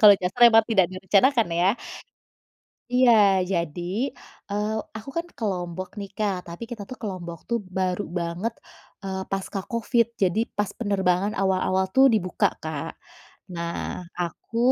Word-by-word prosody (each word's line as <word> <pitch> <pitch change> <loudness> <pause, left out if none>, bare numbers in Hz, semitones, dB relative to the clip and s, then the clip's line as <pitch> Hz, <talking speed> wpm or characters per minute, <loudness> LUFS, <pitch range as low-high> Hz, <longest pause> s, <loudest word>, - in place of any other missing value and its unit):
kalau 205 -2 +10
nyasar 185 +6 -3
emang 225 -1 +6
tidak 195 -6 +4
direncanakan 200 +6 +3
ya? 180 - +4 1.3
Iya, 250 -1 +6 0.4
jadi, 175 - -2 0.4
eee, 210 +1 -1 0.2
aku 220 - -9
kan 335 - -1
ke - - -6
Lombok 180 0 -4
nih, 200 - -6
Kak, 195 -4 -1
tapi 170 +7 -7
kita 220 -4 -6
tuh 255 - -7
ke - - -4
Lombok 170 -3 -7
tuh 235 - +2 0.2
baru 185 +1 0 0.2
banget, 170 +7 -2 0.5
eee, 190 -1 -3
pasca 195 +1 -2
Covid, 235 0 +2 0.2
jadi 185 +3 +2 0.2
pas 205 -1 +1
penerbangan 200 -1 +1
awal-awal 190 0 +2
tuh 265 +1 +8
dibuka 185 -4 +2 0.2
Kak. 160 0 -4 0.6
Nah 170 +1 -4
aku 175 +6 -4
190 Hz, 145 wpm, -25 LUFS, 180-220 Hz, 1.3 s, kalau